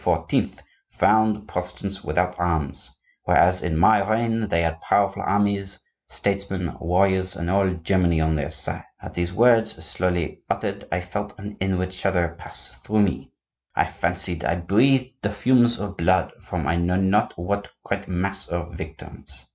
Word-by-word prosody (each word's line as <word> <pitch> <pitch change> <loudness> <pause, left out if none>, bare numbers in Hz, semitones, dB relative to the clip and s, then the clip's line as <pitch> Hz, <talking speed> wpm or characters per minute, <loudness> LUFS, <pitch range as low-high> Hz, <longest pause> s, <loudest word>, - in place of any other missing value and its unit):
found 110 0 +4
the - - -9
Protestants 95 0 -4
without 90 +1 0
arms, 80 -5 -1 0.4
whereas 90 +1 +4
in 80 -3 -1
my 105 +5 +5
reign 115 0 +1
they 85 -3 +1
had 80 0 -2
powerful 100 -1 +1
armies, 100 -1 0 0.3
statesmen, 100 -4 -2
warriors, 95 +2 +2
and 85 +1 -3
all 100 0 +3
Germany 90 -1 +1
on 80 0 +2
their 70 -2 -2
side.' - - -1 0.2
At - - -9
these 85 0 -1
words, 115 +3 +4
slowly 90 -2 -1
uttered, - - -2
I 90 +2 0
felt 105 +4 -5
an 105 0 -8
inward 95 -1 -1
shudder 90 -3 0
pass 85 - -5
through 105 0 +2
me. 95 - -2 0.5
I - - +3
fancied 90 -1 -1
I 85 - +1
breathed 125 +9 +3
the 100 - 0
fumes 120 +3 +3
of 100 -1 -5
blood 95 +3 +2
from - - -4
I 85 - +1
know 85 +1 +1
not 95 +3 +2
what 100 +4 -2 0.2
great 100 0 -3
mass 95 +2 -2
of 85 0 -4
victims. 80 0 -10
95 Hz, 155 wpm, -24 LUFS, 85-100 Hz, 0.5 s, my